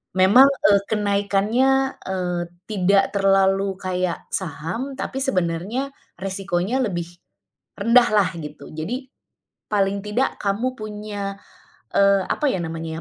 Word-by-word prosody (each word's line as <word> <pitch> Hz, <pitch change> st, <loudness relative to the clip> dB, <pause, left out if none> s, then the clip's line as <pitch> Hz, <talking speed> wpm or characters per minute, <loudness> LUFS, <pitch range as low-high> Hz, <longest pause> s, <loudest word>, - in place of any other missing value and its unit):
Memang, 200 Hz, +9 st, +7 dB
eee, 205 Hz, -7 st, +3 dB
kenaikannya, 215 Hz, +6 st, +1 dB
eee, 180 Hz, -2 st, -2 dB, 0.3 s
tidak 195 Hz, 0 st, +3 dB
terlalu 195 Hz, 0 st, +2 dB
kayak 185 Hz, -2 st, -2 dB
saham, 190 Hz, -, -4 dB
tapi 265 Hz, 0 st, -4 dB
sebenarnya 205 Hz, -, -1 dB, 0.2 s
resikonya 190 Hz, +4 st, -2 dB
lebih 175 Hz, -9 st, -1 dB, 0.7 s
rendah 240 Hz, +1 st, +5 dB
lah, 200 Hz, -3 st, +4 dB
gitu. 150 Hz, -1 st, -9 dB
Jadi, 245 Hz, -, -5 dB, 0.6 s
paling 200 Hz, -1 st, +1 dB
tidak 210 Hz, +6 st, 0 dB
kamu 220 Hz, +6 st, 0 dB
punya, 210 Hz, -2 st, -5 dB, 0.6 s
eee, 200 Hz, -1 st, +4 dB
apa 300 Hz, -, 0 dB
ya, -, -, -1 dB
namanya 165 Hz, 0 st, -5 dB
200 Hz, 110 wpm, -22 LUFS, 185-230 Hz, 0.7 s, Memang